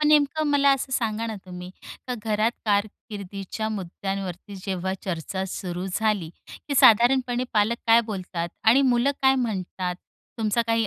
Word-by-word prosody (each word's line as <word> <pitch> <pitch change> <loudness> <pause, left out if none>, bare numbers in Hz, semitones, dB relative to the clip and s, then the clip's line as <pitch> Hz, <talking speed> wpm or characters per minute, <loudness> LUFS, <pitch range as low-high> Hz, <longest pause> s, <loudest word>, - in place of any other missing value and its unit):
पण 300 - +3
नेमकं 300 +1 +3
मला 280 -1 +4
असं 265 0 -5
सांगाना, 225 -2 -1
तुम्ही 180 0 -8 0.4
का 250 - -2
घरात 215 +1 +1
कारकिर्दीच्या 205 0 -2
मुद्द्यांवरती 195 +1 -5
जेव्हा 190 -1 -2
चर्चा 190 +1 -3
सुरू 180 0 -4
झाली, 210 -7 0 0.4
की 280 - -1
साधारणपणे 245 +1 +5
पालक 215 +2 +2
काय 230 +1 +7
बोलतात? 180 -3 -4 0.2
आणि 245 +5 +6
मुलं 240 +4 +3
काय 265 0 +6
म्हणतात? 185 -4 -3 0.4
तुमचा 220 +1 +1
काही 225 -1 +2
215 Hz, 140 wpm, -25 LUFS, 190-240 Hz, 0.4 s, काय